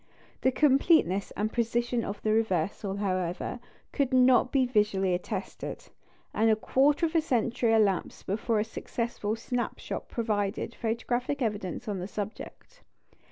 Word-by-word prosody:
The 260 Hz, -, +3 dB
completeness 270 Hz, -, +3 dB
and 215 Hz, +1 st, -1 dB
precision 235 Hz, 0 st, 0 dB
of 200 Hz, 0 st, -5 dB
the 215 Hz, -, +2 dB
reversal, 195 Hz, -2 st, 0 dB
however, 185 Hz, +2 st, -2 dB, 0.3 s
could 280 Hz, -2 st, 0 dB
not 255 Hz, -1 st, +5 dB
be 265 Hz, -2 st, +3 dB
visually 210 Hz, -6 st, +1 dB
attested; 185 Hz, +2 st, -5 dB, 0.4 s
and 225 Hz, +1 st, +3 dB
a 220 Hz, -, +5 dB
quarter 280 Hz, +8 st, +2 dB
of 320 Hz, -, -2 dB
a 330 Hz, -, +4 dB
century 240 Hz, -4 st, +1 dB
elapsed 200 Hz, -4 st, +1 dB
before 215 Hz, +3 st, 0 dB
a -, -, +2 dB
successful 225 Hz, -1 st, -3 dB
"snap 240 Hz, +2 st, -3 dB
shot" -, -, -6 dB
provided 210 Hz, -3 st, -1 dB
photographic 245 Hz, +4 st, -2 dB
evidence 210 Hz, 0 st, -3 dB
on 200 Hz, -3 st, -2 dB
the 180 Hz, -, -4 dB
subject. 215 Hz, -, -7 dB
225 Hz, 140 wpm, -28 LUFS, 205-250 Hz, 0.4 s, not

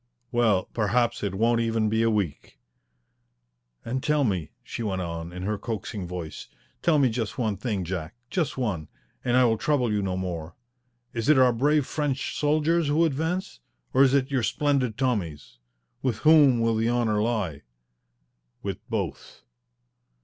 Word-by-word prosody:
"Well, 110 Hz, -6 st, +2 dB
perhaps 120 Hz, +2 st, +1 dB
it 100 Hz, -2 st, -2 dB
won't 115 Hz, +3 st, +2 dB
even 115 Hz, -1 st, +1 dB
be 110 Hz, +1 st, +1 dB
a 115 Hz, -, +3 dB
week." 100 Hz, -9 st, -2 dB, 1.3 s
"And 130 Hz, +3 st, -2 dB
tell 150 Hz, 0 st, +2 dB
me," 95 Hz, -, -1 dB
she -, -, -6 dB
went 95 Hz, -4 st, -2 dB
on, 85 Hz, 0 st, -5 dB
in 90 Hz, +1 st, -7 dB
her 105 Hz, +1 st, -2 dB
coaxing 105 Hz, -4 st, -4 dB
voice, 85 Hz, -3 st, -6 dB, 0.3 s
"tell 170 Hz, -3 st, +3 dB
me 140 Hz, -2 st, +4 dB
just 115 Hz, -2 st, -3 dB
one 110 Hz, -5 st, 0 dB
thing, 100 Hz, -1 st, -2 dB
Jack. 90 Hz, +2 st, -5 dB, 0.2 s
Just 170 Hz, -8 st, -1 dB
one, 100 Hz, -, -2 dB, 0.4 s
and 120 Hz, 0 st, +2 dB
I 130 Hz, -, +6 dB
will 110 Hz, -2 st, +2 dB
trouble 125 Hz, -7 st, +1 dB
you 105 Hz, -, +1 dB
no 95 Hz, -2 st, -2 dB
more. 85 Hz, -3 st, -4 dB, 0.6 s
Is 115 Hz, +3 st, -1 dB
it 155 Hz, -, +6 dB
our 130 Hz, -2 st, +5 dB
brave 145 Hz, +4 st, +2 dB
French 145 Hz, -2 st, -2 dB
soldiers 155 Hz, +2 st, +2 dB
who 155 Hz, +4 st, +3 dB
advance? 160 Hz, -, -2 dB, 0.3 s
Or 130 Hz, -, +4 dB
is 135 Hz, 0 st, +5 dB
it 135 Hz, 0 st, +1 dB
your 135 Hz, -2 st, +1 dB
splendid 135 Hz, -2 st, 0 dB
Tommies? 90 Hz, -, -2 dB, 0.4 s
With 125 Hz, -5 st, 0 dB
whom 145 Hz, -6 st, +6 dB
will 115 Hz, 0 st, +2 dB
the 115 Hz, +1 st, +1 dB
honour 115 Hz, -3 st, +1 dB
lie?" 105 Hz, -11 st, -1 dB, 1.0 s
"With -, -, -3 dB
both." -, -, -4 dB
115 Hz, 165 wpm, -26 LUFS, 100-135 Hz, 1.3 s, I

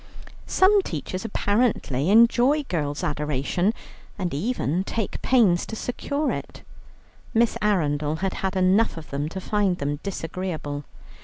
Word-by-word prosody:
Some 395 Hz, +2 st, +5 dB
teachers 185 Hz, -, -5 dB
apparently 205 Hz, -, 0 dB
enjoy 240 Hz, +7 st, +5 dB
girl 145 Hz, -, -2 dB
adorations, 150 Hz, -, 0 dB, 0.4 s
and 180 Hz, -3 st, -2 dB
even 180 Hz, -, -1 dB
take 220 Hz, +1 st, -3 dB
pains 210 Hz, -9 st, +4 dB
to 220 Hz, -, -5 dB
secure 285 Hz, +6 st, -2 dB
them. -, -, -6 dB, 0.7 s
Miss 230 Hz, 0 st, +3 dB
Arundel 150 Hz, -7 st, +1 dB
had 190 Hz, +3 st, -2 dB
had 190 Hz, 0 st, -1 dB
enough 185 Hz, +2 st, +3 dB
of 160 Hz, -, -9 dB
them 145 Hz, +2 st, -2 dB
to 190 Hz, -, -5 dB
find 195 Hz, -2 st, 0 dB
them 145 Hz, -1 st, -2 dB
disagreeable. 165 Hz, -6 st, -4 dB
185 Hz, 130 wpm, -24 LUFS, 150-225 Hz, 0.7 s, Some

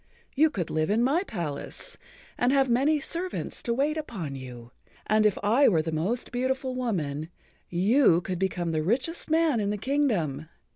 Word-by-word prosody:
You 310 Hz, +3 st, +5 dB
could 190 Hz, -, -4 dB
live 155 Hz, +1 st, 0 dB
in 220 Hz, +3 st, +2 dB
my 285 Hz, +8 st, +2 dB
palace 170 Hz, -, -6 dB, 0.4 s
and 245 Hz, +1 st, +2 dB
have 270 Hz, -2 st, +3 dB
many 285 Hz, +6 st, +3 dB
servants 345 Hz, +5 st, -3 dB
to 235 Hz, -, -2 dB
wait 295 Hz, +4 st, 0 dB
upon 200 Hz, -, -5 dB
you, 125 Hz, -3 st, -9 dB, 0.3 s
and 215 Hz, 0 st, +4 dB
if 205 Hz, -, -1 dB
I 235 Hz, +7 st, +4 dB
were 165 Hz, -6 st, +3 dB
the 160 Hz, -, -3 dB
most 190 Hz, +11 st, -2 dB
beautiful 260 Hz, +1 st, -1 dB
woman, 165 Hz, -, -2 dB, 0.4 s
you 190 Hz, -, +4 dB
could 180 Hz, -1 st, -4 dB
become 180 Hz, -3 st, -1 dB
the 155 Hz, -1 st, 0 dB
richest 255 Hz, -, -1 dB
man 320 Hz, -5 st, +3 dB
in 200 Hz, -1 st, 0 dB
the 210 Hz, -, -1 dB
kingdom. 200 Hz, -, 0 dB
220 Hz, 175 wpm, -27 LUFS, 165-270 Hz, 0.4 s, You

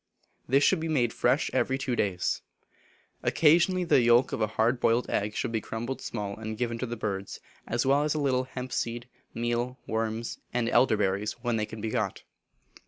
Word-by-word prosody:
This 135 Hz, +3 st, +4 dB
should 190 Hz, -, +4 dB
be 160 Hz, -, -3 dB
made 125 Hz, -7 st, +1 dB
fresh -, -, +1 dB
every 130 Hz, -, +1 dB
two 135 Hz, -2 st, -2 dB
days. 95 Hz, -6 st, 0 dB, 0.8 s
Occasionally 175 Hz, +4 st, +4 dB
the 170 Hz, -6 st, +4 dB
yolk 120 Hz, +2 st, +4 dB
of -, -, -3 dB
a 110 Hz, -, +3 dB
hard 120 Hz, +3 st, +3 dB
boiled 115 Hz, 0 st, +2 dB
egg 105 Hz, +1 st, -1 dB
should -, -, -2 dB
be 110 Hz, -1 st, -1 dB
crumbled 120 Hz, +5 st, -5 dB
small 100 Hz, -3 st, -4 dB
and 110 Hz, 0 st, -5 dB
given 115 Hz, -1 st, -2 dB
to 130 Hz, -, -2 dB
the 120 Hz, 0 st, -5 dB
birds, 100 Hz, -2 st, -4 dB, 0.3 s
as 120 Hz, +2 st, 0 dB
well 140 Hz, +2 st, +4 dB
as 150 Hz, 0 st, 0 dB
a -, -, 0 dB
little 130 Hz, -3 st, +1 dB
hemp 130 Hz, 0 st, -7 dB
seed, 120 Hz, +1 st, -2 dB, 0.3 s
meal, 120 Hz, +2 st, -1 dB
worms, 110 Hz, +1 st, -2 dB, 0.2 s
and 120 Hz, -2 st, +1 dB
elder 120 Hz, -2 st, +4 dB
berries 100 Hz, +3 st, 0 dB
when 120 Hz, -2 st, 0 dB
they 105 Hz, -1 st, -1 dB
can 110 Hz, -1 st, -8 dB
be 110 Hz, 0 st, -2 dB
got. 110 Hz, -6 st, -2 dB
120 Hz, 195 wpm, -28 LUFS, 110-130 Hz, 0.8 s, This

